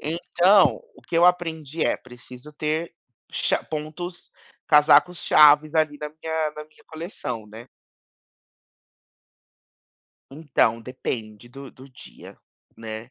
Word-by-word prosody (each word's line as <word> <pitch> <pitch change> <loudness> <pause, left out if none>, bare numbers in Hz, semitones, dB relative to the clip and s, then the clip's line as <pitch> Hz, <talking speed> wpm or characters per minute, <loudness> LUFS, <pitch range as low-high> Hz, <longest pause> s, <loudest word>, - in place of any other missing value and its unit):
Então 175 +5 +2
o - - -18
que 165 - -4
eu 170 - +5
aprendi 165 -4 -1
é, - - +1
preciso 125 +3 -13
ter 155 +3 -3 0.4
cha - - -1
pontos 160 +4 -7 0.4
casacos-chaves, 150 -1 +5
ali, 155 -2 +1
na 150 - -5
minha 160 0 -3
na 150 - -8
minha 155 0 -25
coleção, 160 - -7
né. 110 +3 -12 2.6
Então, 135 -6 0
depende 115 -2 -7
do 135 +2 -11
do 130 +1 -16
dia, 125 -2 -14 0.4
né, 110 +1 -8
150 Hz, 110 wpm, -23 LUFS, 125-160 Hz, 2.6 s, eu